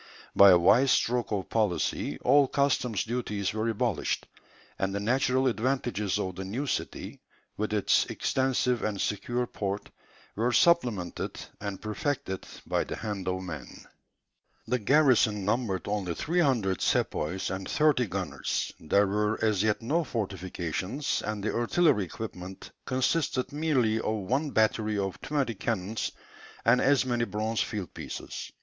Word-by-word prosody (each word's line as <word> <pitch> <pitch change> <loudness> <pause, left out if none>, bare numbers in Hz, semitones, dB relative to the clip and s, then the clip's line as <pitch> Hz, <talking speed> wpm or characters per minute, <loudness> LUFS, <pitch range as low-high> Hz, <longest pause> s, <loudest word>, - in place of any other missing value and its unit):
By 100 - +9
a 90 - +8
wise 110 +10 +5
stroke 125 -2 +2
of 100 -3 -1
policy 105 -6 0
all 140 +2 +5
customs 130 -6 +1
duties 105 -5 -2
were 110 +1 -1
abolished; 115 -3 -1 0.5
and 95 0 -1
the - - 0
natural 130 +4 +2
advantages 120 -5 0
of 95 -3 -3
the 95 - -4
new 115 +10 -3
city, 135 - -4 0.3
with 110 +1 -2
its 105 -2 +3
extensive 130 -2 0
and 105 -2 -2
secure 120 +5 -1
port, 100 -3 -4 0.4
were 120 +4 +1
supplemented 120 - +2 0.2
and 100 -2 -5
perfected 110 - -3 0.2
by - - 0
the - - -5
hand 100 -4 -5
of 95 0 -1
man. 80 -6 -8 0.8
The 125 +2 +1
garrison 115 -5 +3
numbered 105 -3 -1
only 100 -4 -2
300 135 - +1
sepoys 90 +5 0
and 95 0 -4
thirty 150 -6 +3
gunners; - - -2
there 100 +6 +3
were 105 +2 0
as 105 -4 +2
yet 110 +1 +1
no 160 +8 +1
fortifications, 95 - -3
and 105 -1 -3
the 110 - -1
artillery 120 - +2
equipment 95 -1 -8
consisted 130 +1 0
merely 135 -8 +1
of 110 - -1
one 130 +10 -1
battery 110 -3 +1
of 95 -1 -3
twenty 140 -5 -1
cannons, 105 0 -2 0.5
and 125 +2 +5
as 140 -1 +4
many 120 -2 0
bronze 110 +1 -1
field 100 -6 -4
pieces. - - -7
110 Hz, 140 wpm, -28 LUFS, 100-130 Hz, 0.8 s, By